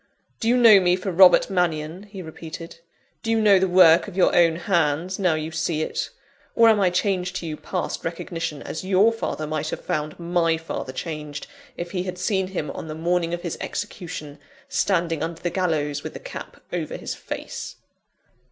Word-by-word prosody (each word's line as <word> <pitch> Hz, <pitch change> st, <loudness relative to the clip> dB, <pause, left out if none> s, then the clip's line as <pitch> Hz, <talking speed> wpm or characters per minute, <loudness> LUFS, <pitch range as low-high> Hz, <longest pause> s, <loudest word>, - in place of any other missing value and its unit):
"Do 225 Hz, -, -2 dB
you 245 Hz, +2 st, +4 dB
know 225 Hz, -5 st, +8 dB
me 180 Hz, -1 st, +3 dB
for 190 Hz, +1 st, -3 dB
Robert 180 Hz, +1 st, +7 dB
Mannion?" 175 Hz, +1 st, -1 dB
he 195 Hz, -2 st, -8 dB
repeated. 165 Hz, +1 st, -9 dB, 0.4 s
"Do 225 Hz, -, -4 dB
you 225 Hz, 0 st, +3 dB
know 205 Hz, -3 st, +6 dB
the 190 Hz, -, +2 dB
work 175 Hz, -2 st, +6 dB
of 195 Hz, -2 st, -9 dB
your 185 Hz, -, +4 dB
own 165 Hz, -2 st, +5 dB
hands, 170 Hz, 0 st, 0 dB
now 180 Hz, -5 st, +2 dB
you 155 Hz, +1 st, -4 dB
see 160 Hz, -1 st, -1 dB
it? -, -, -3 dB, 0.5 s
Or, 230 Hz, 0 st, +7 dB
am 220 Hz, -2 st, +4 dB
I 190 Hz, -2 st, +4 dB
changed 180 Hz, 0 st, 0 dB
to 175 Hz, -, -4 dB
you 155 Hz, -2 st, -3 dB
past 180 Hz, +4 st, -4 dB
recognition, 165 Hz, -2 st, -4 dB
as 155 Hz, -, -5 dB
your 195 Hz, +4 st, +4 dB
father 190 Hz, -8 st, -3 dB
might 155 Hz, 0 st, -2 dB
have -, -, -6 dB
found 150 Hz, 0 st, -2 dB
my 170 Hz, -1 st, +1 dB
father 160 Hz, -4 st, -5 dB
changed, 150 Hz, 0 st, -6 dB, 0.3 s
if 175 Hz, 0 st, -5 dB
he 180 Hz, -, -1 dB
had 180 Hz, 0 st, -5 dB
seen 190 Hz, +1 st, 0 dB
him 175 Hz, -6 st, -4 dB
on -, -, -7 dB
the 155 Hz, -, -5 dB
morning 170 Hz, +1 st, 0 dB
of 175 Hz, 0 st, -4 dB
his 170 Hz, -, -4 dB
execution, 155 Hz, -5 st, -6 dB, 0.3 s
standing 165 Hz, +2 st, 0 dB
under 165 Hz, 0 st, -3 dB
the 175 Hz, -, 0 dB
gallows, 150 Hz, -6 st, 0 dB
with -, -, -7 dB
the -, -, -7 dB
cap -, -, -9 dB
over -, -, -3 dB
his -, -, -5 dB
face?" -, -, -7 dB
175 Hz, 195 wpm, -24 LUFS, 160-185 Hz, 0.5 s, know